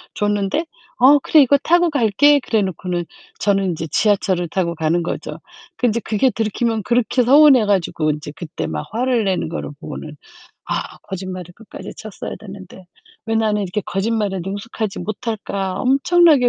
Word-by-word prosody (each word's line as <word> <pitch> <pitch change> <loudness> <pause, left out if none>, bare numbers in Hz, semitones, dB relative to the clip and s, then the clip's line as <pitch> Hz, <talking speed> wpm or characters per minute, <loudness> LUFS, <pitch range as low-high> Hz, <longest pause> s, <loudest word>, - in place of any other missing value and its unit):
줬는데 205 - 0 0.3
"아 280 +4 +7
그래 310 - +5
이거 280 +2 +4
타고 345 0 +3
갈게." 285 +3 +4
그래 220 -4 0
놓고는 180 -1 -3 0.3
저는 195 -1 +1
인제 160 0 -4
지하철을 195 -3 +1
타고 170 0 -1
가는 165 +2 0
거죠. - - -5 0.4
그 - - 0
인제 230 +1 0
그게 225 +5 +1
들키면 225 0 -1
그렇게 245 +2 +1
서운해 270 -3 +6
가지고 170 -6 0
인제 150 0 -6
그때 155 - -5
막 75 -1 -4
화를 245 -1 +1
내는 185 -4 -1
거를 - - -5
보고는 150 -1 -8 0.5
'아 - - -4
거짓말을 185 -2 -7
끝까지 225 +2 -10
쳤어야 215 -3 -7
됐는데 190 -2 -11 0.4
왜 225 - -1
나는 210 -2 +1
이렇게 195 +3 -2
거짓말에 200 -1 -1
능숙하지 205 +1 -4
못할까?' 205 -3 -4
엄청나게 280 0 +4
210 Hz, 355 characters per minute, -19 LUFS, 185-240 Hz, 0.5 s, 아